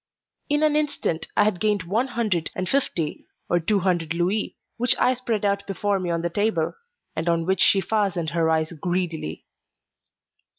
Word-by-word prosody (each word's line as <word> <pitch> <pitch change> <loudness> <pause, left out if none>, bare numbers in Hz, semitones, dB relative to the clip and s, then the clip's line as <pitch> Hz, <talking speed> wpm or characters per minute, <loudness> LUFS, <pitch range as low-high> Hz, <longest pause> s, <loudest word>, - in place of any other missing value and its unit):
In 295 +1 +2
an 305 -1 +3
instant 295 - -1
I - - +6
had 205 -4 +1
gained 210 -4 +1
one 215 +10 0
hundred 215 -9 -1
and 185 0 -2
fifty 185 - -1 0.2
or 175 - +2
two 195 +4 +1
hundred 170 -3 0
louis, 185 +5 0 0.2
which 245 +1 +3
I 255 - +3
spread 235 -5 -1
out 200 0 +1
before 200 +1 0
me 180 -1 -3
on 170 0 -1
the 170 - 0
table, 175 -5 0 0.4
and 160 +2 -1
on 165 -1 +1
which 190 +2 +1
she 195 - +5
fastened 190 -7 0
her 165 -1 +1
eyes 160 0 +1
greedily. 170 - -3
185 Hz, 175 wpm, -24 LUFS, 170-215 Hz, 0.4 s, I